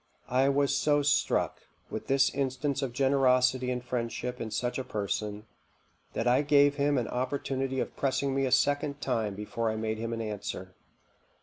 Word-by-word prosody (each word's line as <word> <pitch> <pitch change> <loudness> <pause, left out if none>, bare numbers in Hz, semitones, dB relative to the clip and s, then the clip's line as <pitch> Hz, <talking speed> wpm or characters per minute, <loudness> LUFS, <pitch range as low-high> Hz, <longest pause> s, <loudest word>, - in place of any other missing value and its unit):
I 130 +2 +4
was 140 0 +2
so 145 -1 +2
struck 145 - +1 0.3
with - - -5
this 135 0 +3
instance 135 +1 -1
of 135 -3 -2
generosity 130 -1 +3
and 125 -1 -2
friendship 125 0 -3
in 110 - -3
such 120 +4 -2
a - - -2
person, 105 -1 -3 0.7
that - - -1
I 125 +3 +4
gave 145 0 +4
him 145 0 +2
an 120 - 0
opportunity 130 +1 -2
of - - -3
pressing 135 0 0
me 135 0 +1
a - - -3
second 145 +2 +2
time 110 -7 -1
before 110 +2 -2
I 110 - -2
made 110 0 -2
him 115 +1 -3
an 115 0 -3
answer. 100 -3 -5
130 Hz, 175 wpm, -29 LUFS, 115-140 Hz, 0.7 s, I